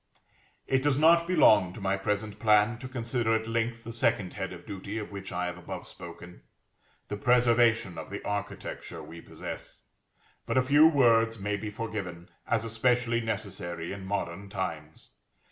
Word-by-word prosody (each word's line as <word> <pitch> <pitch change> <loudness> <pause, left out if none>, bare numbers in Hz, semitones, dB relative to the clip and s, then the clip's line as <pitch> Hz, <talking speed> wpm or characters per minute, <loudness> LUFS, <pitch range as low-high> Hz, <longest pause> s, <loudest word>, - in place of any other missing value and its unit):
It 130 -1 +2
does 145 -1 +2
not 170 +2 +5
belong 110 - +5
to - - -9
my 95 -1 0
present 105 +1 -2
plan 105 +1 +4
to 130 - -7
consider 120 -2 0
at 110 0 -1
length 115 0 -1
the 115 - -7
second 100 -5 0
head 95 - -4
of 85 -1 -10
duty 100 0 -6
of 105 -2 -5
which 100 -1 -7
I 90 +1 -1
have 90 0 -5
above 85 - -7
spoken; 85 +1 -11 0.7
the 105 - -4
preservation 120 -4 +3
of - - -8
the - - -6
architecture 105 0 -5
we 85 0 -10
possess: - - -8 0.6
but - - 0
a 130 - +5
few 145 +4 +7
words 115 -6 +4
may 105 0 -2
be 105 +1 -4
forgiven, 100 -5 -5 0.2
as 115 -1 +1
especially 120 +1 +1
necessary 95 -6 -4
in 100 -1 -7
modern 95 0 -3
times. 80 -6 -5
110 Hz, 165 wpm, -29 LUFS, 95-120 Hz, 0.7 s, few